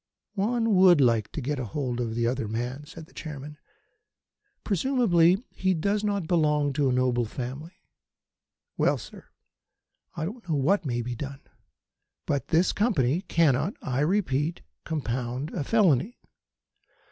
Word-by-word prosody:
"One 225 +2 +1
would 185 -3 +6
like 115 -5 +2
to 155 - -4
get 140 +2 -2
hold 125 +1 -3
of 115 -2 -3
the 120 0 0
other 120 -1 -1
man," 125 +6 -4
said 165 -1 -10
the - - -24
Chairman. 150 -1 -8 1.0
"Presumably 195 -4 +3
he 185 -1 0
does 200 +6 0
not 200 -5 -1
belong 150 -4 +2
to 140 -1 +1
a - - +1
noble 125 -1 +1
family. 130 - -7 0.9
Well, - - +2
sir, - - -11 0.9
I 160 - -2
don't 210 +1 -8
know 155 - +1
what 160 +5 +1
may 120 -2 -1
be 125 +1 -4
done; 135 +3 -7 0.8
but 140 -4 -1
this 170 +3 +3
Company 170 - +1
cannot, 160 - +2
I 130 -2 -1
repeat, 155 -2 0 0.2
compound 130 -2 -3
a - - -2
felony." 195 - +2
150 Hz, 140 wpm, -27 LUFS, 130-185 Hz, 1.0 s, would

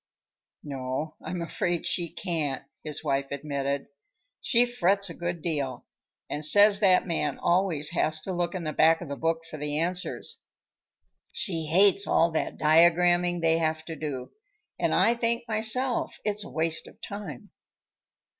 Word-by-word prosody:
"No, 135 +2 -4
I'm 170 +1 -4
afraid 175 0 -2
she 170 -2 -1
can't," 160 -6 -2 0.2
his 150 -2 -4
wife 140 0 0
admitted. 140 -1 -3 0.5
"She 240 -1 +3
frets 200 -5 +1
a - - -7
good 175 -1 -4
deal 140 -7 -3 0.4
and 150 - -3
says 205 +6 +7
that 190 -3 +4
man 170 -3 -1
always 170 -5 +1
has 155 -2 0
to 190 - -5
look 175 0 -2
in 180 - -4
the 155 -1 -3
back 165 +1 +4
of 170 - -7
the 140 - -3
book 165 +2 -1
for 155 - -8
the 150 0 -3
answers. 180 +3 -2 0.9
She 165 -4 -3
hates 195 +4 +4
all 170 0 +3
that 160 - -2
diagramming 175 +2 +4
they 165 0 +3
have 160 -1 -1
to 165 - -6
do, 140 -4 -5 0.5
and - - +1
I 230 - +4
think 235 0 -1
myself 230 +3 +1
it's 210 0 0
a - - -9
waste 160 +4 -2
of - - -16
time." 200 -11 -8
165 Hz, 155 wpm, -27 LUFS, 155-185 Hz, 0.9 s, says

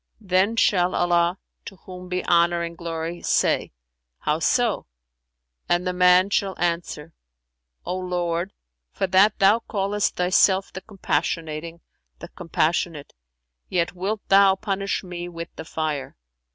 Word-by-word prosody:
Then 195 +1 +1
shall 185 -5 +2
Allah 175 +1 +2 0.3
(to 195 - -9
whom 180 0 -11
be 180 0 -2
honour 170 0 +3
and 170 0 -5
glory!) 165 0 -5
say, - - +1 0.5
'How 150 +1 0
so?' 225 +8 +1 0.8
and 175 +1 +1
the 180 - -1
man 180 +2 +4
shall 195 -1 0
answer, 170 -2 -3 0.7
O 180 - -2
Lord, 175 0 -2 0.4
for 195 - -1
that 190 +3 +4
Thou 205 +2 +4
callest 205 -2 -1
Thyself 190 +2 +2
the 190 - -7
Compassionating, 165 -5 -3 0.4
the 170 - -10
Compassionate, 165 -2 -2 0.6
yet 175 0 0
wilt 200 +4 -4
Thou 195 0 +6
punish 195 +1 -2
me 175 -1 -6
with 170 -1 -8
the - - -8
Fire!' 155 - -4
180 Hz, 130 wpm, -23 LUFS, 170-195 Hz, 0.8 s, Thou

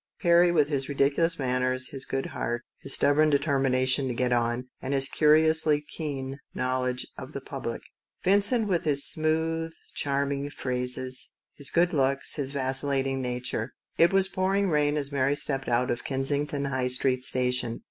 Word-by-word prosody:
Perry 175 -1 +5
with 150 -4 +3
his 140 -2 -1
ridiculous 145 +4 +2
manners, 130 -1 0
his 135 -1 -3
good 135 0 -2
heart, 120 +1 -3 0.2
his - - +1
stubborn 155 +2 +4
deter 140 -1 +1
mination 130 +1 +1
to 125 - -3
get 125 0 +1
on, 120 +1 0
and 135 +1 -2
his 135 0 +1
curiously 155 0 +3
keen 140 -3 -5 0.2
knowledge 125 0 -1
of - - -9
the - - -4
public; - - -6 0.4
Vincent 205 +4 +3
with 180 -3 0
his 140 -3 +2
smooth, 160 +1 -1 0.2
charming 140 0 -1
phrases, 125 -1 -3 0.2
his 140 -2 -3
good 175 +1 +2
looks, 135 -1 +1
his 140 -3 -2
vacillating 135 0 -1
nature. 125 -1 -3 0.3
It 170 - +6
was 195 0 +3
pouring 195 0 0
rain 150 0 +2
as 140 -1 -3
Mary 140 0 +1
stepped 135 -2 -2
out 120 +1 +1
of 120 - -3
Kensington 140 +1 -2
High 130 -2 -1
Street 125 0 +1
Station. 125 -2 0
140 Hz, 160 wpm, -27 LUFS, 130-155 Hz, 0.4 s, It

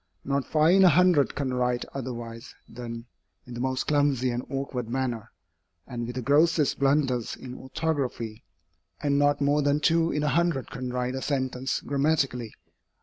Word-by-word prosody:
Not 140 -1 -1
five 155 +2 +4
in 195 - +6
a 185 - +8
hundred 175 -3 +4
can 135 -3 -2
write 125 -1 0
otherwise 120 -3 -6
than 115 -1 -7 0.4
in 125 - -10
the 120 - -6
most 130 +1 -1
clumsy 140 -4 +2
and 120 +1 -3
awkward 135 -4 -3
manner, 120 -3 -2 0.6
and 120 -2 -5
with 120 - -6
the 130 - -3
grossest 150 +2 +3
blunders 135 -4 +1
in 125 -1 -9
orthography, 130 -5 -3 0.6
and 140 -1 +1
not 145 0 +2
more 145 +1 +3
than 145 +1 +2
two 165 +1 +2
in 150 - -1
a 150 - +2
hundred 165 -2 0
can 125 0 -5
write 125 0 -2
a 130 - -4
sentence 130 -2 -1
grammatically. 140 -5 0
135 Hz, 165 wpm, -27 LUFS, 125-145 Hz, 0.6 s, a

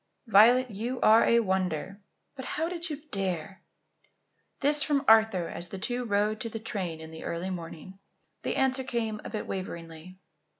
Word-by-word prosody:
"Violet, 240 +3 +5
you 235 +5 -4
are 220 +1 +6
a 235 0 +4
wonder. 190 -2 -2 0.3
But 260 - -7
how 320 +2 -2
did 340 0 -4
you 295 -1 -6
dare?" 190 -1 -3 1.0
This 295 +1 +5
from 285 -1 +1
Arthur 220 -6 +5
as 170 +1 -5
the 195 - -6
two 245 +5 -2
rode 210 0 0
to 230 - -4
the 225 - -5
train 195 -7 -4
in 160 0 -10
the 160 - -9
early 175 +3 -3
morning. 175 +2 -8 0.4
The - - -2
answer 265 0 +1
came 225 -4 -3
a - - -6
bit 215 - -4
waveringly. 170 -1 -7
210 Hz, 170 wpm, -28 LUFS, 185-245 Hz, 1.0 s, are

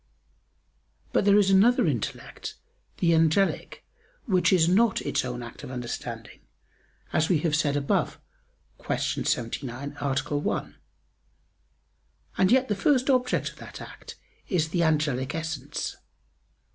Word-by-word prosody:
But - - +2
there 205 0 +6
is 200 -2 +4
another 235 +5 +5
intellect, 130 -10 -3 0.4
the 170 -1 +3
angelic, 165 +4 +1 0.4
which 180 - +3
is 170 -4 +4
not 205 +4 +3
its - - 0
own 125 -1 -4
act 120 - -10
of - - -7
understanding, 125 -2 -6 0.7
as 155 0 +2
we 180 - +4
have 155 -2 +1
said 145 -2 +1
above 140 -1 0 0.6
(Q. - - -1 0.3
79, 125 +4 -3
A. 140 +1 -1
1), - - -3 1.6
and 190 0 +3
yet 260 +1 +4
the 210 - +1
first 265 +5 +2
object 250 -1 +1
of - - -20
that - - -10
act - - -10 0.3
is 160 -5 0
the 175 +1 0
angelic 150 -4 +1
essence. 160 -2 -4
160 Hz, 130 wpm, -26 LUFS, 140-195 Hz, 1.6 s, there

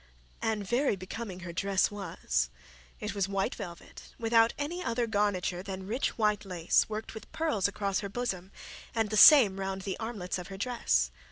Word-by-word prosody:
And 215 -3 -1
very 245 +1 +2
becoming 190 0 -7
her 170 -1 -7
dress 195 +3 +1
was. 165 - -2 0.5
It - - -4
was 195 -1 -1
white 195 -1 0
velvet, 170 -2 -10
without 230 0 +4
any 335 +5 -3
other 235 0 0
garniture 200 -5 0
than 190 0 -6
rich 235 +7 -2
white 210 -2 +1
lace 180 -2 +1
worked 215 +1 -5
with 220 - -10
pearls 305 - +1
across 200 -1 -1
her 200 - -5
bosom, 195 -5 -3 0.4
and 220 -2 0
the - - 0
same 215 -6 +8
round 190 0 -3
the 190 -1 -4
armlets 205 -6 -4
of 180 - -7
her 195 - -8
dress. 190 - +1
200 Hz, 175 wpm, -30 LUFS, 185-225 Hz, 0.5 s, same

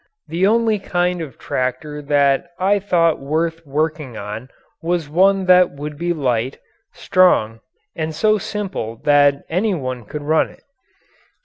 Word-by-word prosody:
The 180 +4 +2
only 225 -1 +2
kind 180 -2 -1
of 155 -5 -8
tractor 130 +4 -3
that 140 +2 +2
I 200 +2 +2
thought 170 -4 +2
worth 160 +4 -2
working 150 -3 -2
on 105 +5 -7 0.3
was 170 -2 -1
one 190 +5 +3
that 180 -1 +6
would 145 +1 -6
be 170 +3 -2
light, 130 -5 -1 0.3
strong, 115 -12 +2 0.4
and 160 -1 -3
so 215 +6 +2
simple 190 - -4
that 145 -1 +4
any 190 +4 0
one 130 -6 -5
could 150 +7 -6
run 155 +2 +2
it. - - -19
160 Hz, 140 wpm, -19 LUFS, 140-180 Hz, 0.4 s, that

